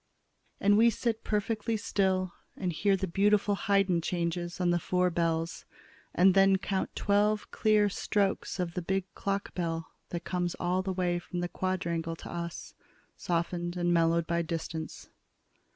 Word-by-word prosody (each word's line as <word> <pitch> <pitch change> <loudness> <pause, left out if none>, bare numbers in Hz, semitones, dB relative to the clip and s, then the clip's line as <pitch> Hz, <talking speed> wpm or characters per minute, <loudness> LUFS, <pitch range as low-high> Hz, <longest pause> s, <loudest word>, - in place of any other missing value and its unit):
And 205 +1 +4
we 235 +1 +7
sit 230 -1 -2
perfectly 215 +1 -1
still 190 -4 0 0.2
and 180 -2 -2
hear 195 +4 +2
the 190 - -1
beautiful 205 +3 +2
Haydn 195 -3 +2
changes 175 +1 -2
on 180 -1 +2
the 175 - +2
four 180 +1 +1
bells, 165 0 -1 0.5
and 185 +1 +6
then 195 0 +5
count 190 0 -2
twelve 210 +1 +1
clear 215 -1 +3
strokes 200 0 -1
of 175 -2 -2
the 180 - -2
big 190 +2 -1
clock 200 0 -3
bell 165 -2 -3 0.2
that 170 -1 -4
come 180 -1 -1
all 180 +1 +1
the 190 0 -3
way 180 -1 0
from 175 0 -5
the 175 - -1
Quadrangle 170 -3 -2
to - - -9
us, 170 0 -6 0.4
softened 175 0 -2
and 175 0 +2
mellowed 165 0 +3
by 170 +1 0
the 165 - -6
distance. 160 -1 -5
180 Hz, 160 wpm, -30 LUFS, 170-195 Hz, 0.5 s, we